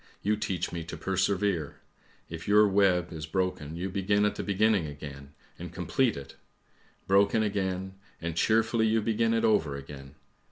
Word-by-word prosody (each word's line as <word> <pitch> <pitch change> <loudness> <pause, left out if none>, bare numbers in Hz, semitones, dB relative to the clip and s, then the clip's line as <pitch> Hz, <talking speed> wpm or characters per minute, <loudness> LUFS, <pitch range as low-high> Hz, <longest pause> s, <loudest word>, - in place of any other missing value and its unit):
You 105 +1 +2
teach 95 -4 -3
me 85 -1 -4
to 85 - -7
persevere! 95 -4 0 0.5
If 85 +1 -8
your 105 +1 +6
web 95 -3 +2
is 80 -1 -6
broken, 80 -3 -2
you 90 +3 -3
begin 100 +2 +1
at 105 - +1
the - - -5
beginning 100 -3 +2
again 70 -1 -9 0.3
and - - -7
complete 130 - 0
it! 70 0 -10 0.7
Broken 100 +3 +3
again 95 -2 -2
— - - -32
and 85 -1 -4
cheerfully 110 +4 +2
you 110 0 +2
begin 115 +1 +1
it 115 - +1
over 80 -10 +2
again. 70 0 -10
95 Hz, 165 wpm, -28 LUFS, 80-105 Hz, 0.7 s, your